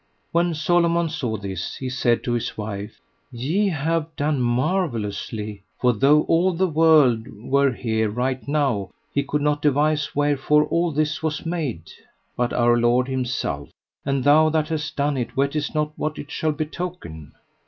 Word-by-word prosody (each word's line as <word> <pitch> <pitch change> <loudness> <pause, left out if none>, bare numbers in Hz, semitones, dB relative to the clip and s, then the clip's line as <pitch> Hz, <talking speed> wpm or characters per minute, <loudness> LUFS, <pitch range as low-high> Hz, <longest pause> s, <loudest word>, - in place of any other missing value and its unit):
When 170 0 +1
Solomon 170 +1 +2
saw 125 -8 -3
this, 95 -3 -5
he 130 - -5
said 125 -2 +1
to 120 - -2
his 120 -1 -2
wife: 105 0 -6 0.3
Ye 155 - 0
have 160 0 -1
done 145 -2 0
marvellously, 120 - -1 0.2
for 125 -1 +3
though 140 +7 +4
all 180 +3 +2
the 185 +3 +1
world 150 -8 +4
were 135 +4 +1
here 110 -2 -1
right 125 +5 -2
now, 135 -10 0 0.2
he 140 - +2
could 145 +1 -2
not 145 0 +1
devise 150 +1 +1
wherefore 145 +1 +3
all 170 +2 0
this 155 +1 -1
was 160 0 -2
made, 145 - -3 0.4
but 120 0 0
Our 120 0 +3
Lord 120 +2 +2
Himself; 125 - -2 0.3
and 135 -2 -1
thou 155 +2 +5
that 155 0 0
hast 155 -1 -3
done 145 0 0
it 120 -1 -4
wottest 145 +3 0
not 150 0 0
what 155 -1 -2
it 145 - -8
shall 155 - 0
betoken. 155 - -6
145 Hz, 160 wpm, -23 LUFS, 120-155 Hz, 0.4 s, thou